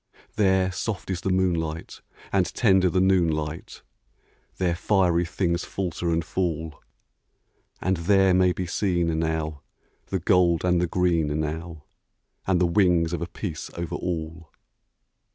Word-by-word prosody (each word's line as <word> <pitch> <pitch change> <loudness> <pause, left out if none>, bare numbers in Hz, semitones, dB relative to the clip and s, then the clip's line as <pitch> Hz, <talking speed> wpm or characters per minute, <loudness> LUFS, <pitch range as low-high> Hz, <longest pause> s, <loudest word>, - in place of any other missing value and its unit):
There 95 -2 +2
soft 95 0 -4
is 90 -1 -3
the 95 - -2
moonlight, 85 -4 -1 0.3
and 95 -2 +2
tender 95 -4 +4
the 90 - +1
noon 95 -3 +3
light; 80 +6 -5 0.7
There 90 -2 +1
fiery 90 -1 +2
things 85 0 -1
falter 90 -2 -3
and 80 -1 0
fall; 80 -4 -3 1.0
And 95 0 +1
there 95 +2 +3
may 90 0 +4
be 90 +1 -3
seen, 85 -3 0
now, 80 -2 -2 0.5
the 95 - -1
gold 90 -1 +3
and 90 -1 +2
the 90 - +1
green, 80 -4 +1
now, 80 +1 -5 0.6
And 95 -2 +2
the 90 - +3
wings 85 -2 +2
of 85 - -2
a 85 - -3
peace 90 -4 -6
over 85 -1 -4
all. 80 -1 -4
85 Hz, 140 wpm, -25 LUFS, 80-95 Hz, 1.0 s, tender